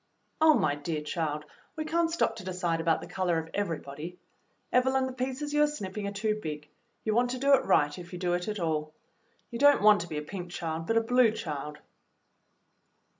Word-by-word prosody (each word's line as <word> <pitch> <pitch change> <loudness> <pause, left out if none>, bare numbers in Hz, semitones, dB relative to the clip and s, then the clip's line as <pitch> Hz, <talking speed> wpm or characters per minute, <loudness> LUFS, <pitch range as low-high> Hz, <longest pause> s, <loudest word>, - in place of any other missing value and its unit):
'^" - - -46 0.4
"Oh, 315 -1 +7
my 145 - +2
dear 150 +2 -3
child, 150 -2 -2 0.3
we 310 -1 -3
can't 330 +1 +1
stop 330 -9 0
to 215 - -8
decide 180 -3 -1
about 165 -1 +2
the - - -8
color 180 -3 0
of 160 0 -4
everybody. 165 -3 -4 0.6
Evelyn, 260 +1 +3
the 260 - -4
pieces 265 +3 -3
you 295 - +3
are 300 - +6
snipping 205 -8 -5
are - - -3
too 215 +1 -1
big. 150 -3 -5 0.4
You 215 - 0
want 245 +2 +3
to 255 - -2
do 275 +2 +3
it 275 - +4
right 145 0 +3
if 175 0 -10
you 180 - -6
do 175 -1 0
it 175 0 -1
at 210 -1 -3
all. 155 -2 -1 0.6
You 235 - -5
don't 285 -5 +6
want 210 -3 +7
to 170 - -7
be 155 - -4
a 150 - -3
pink 180 +2 -7
child, 165 -1 -4
but 225 - +2
a - - +5
blue 245 +1 +4
child." 150 -7 -5
185 Hz, 220 wpm, -29 LUFS, 160-250 Hz, 0.6 s, Oh